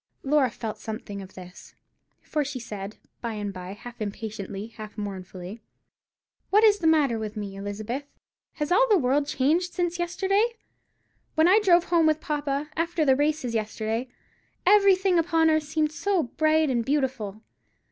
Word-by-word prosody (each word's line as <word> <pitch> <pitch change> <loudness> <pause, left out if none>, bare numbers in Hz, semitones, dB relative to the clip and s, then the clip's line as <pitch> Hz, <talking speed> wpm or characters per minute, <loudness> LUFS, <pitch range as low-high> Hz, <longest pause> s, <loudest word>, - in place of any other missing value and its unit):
Laura 275 -2 +3
felt 225 -1 -6
something 215 -2 -6
of 190 0 -12
this; 180 0 -12 0.5
for 300 -1 -1
she 280 -2 -5
said, 210 -3 -7 0.2
by 235 -2 -3
and 205 -2 -4
by, 185 0 -7
half 240 +3 -11
impatiently, 205 -1 -5
half 215 -1 -10
mournfully,— 190 0 -7 0.9
"What 420 +3 +5
is 415 -2 +6
the 330 - +1
matter 290 -8 +3
with 215 0 -5
me, 200 -2 -5
Elizabeth. 210 +7 -4 0.5
Has 300 +1 -3
all - - +5
the 420 - +6
world 280 0 +1
changed 315 +6 +1
since 350 -1 -1
yesterday? 390 +6 +1 0.8
When 315 +1 +5
I 390 +4 +6
drove 355 -5 +5
home 340 -3 +3
with 310 0 +2
papa, 295 -1 -2
after 330 -1 0
the 265 -2 +5
races 290 -3 0
yesterday, 220 +2 -2 0.6
everything 385 -2 +5
upon 325 -1 +3
earth 310 0 +3
seemed 310 0 0
so 340 +2 0
bright 310 +3 +2
and 235 -2 +1
beautiful. 255 -7 -2
280 Hz, 155 wpm, -26 LUFS, 215-330 Hz, 0.9 s, is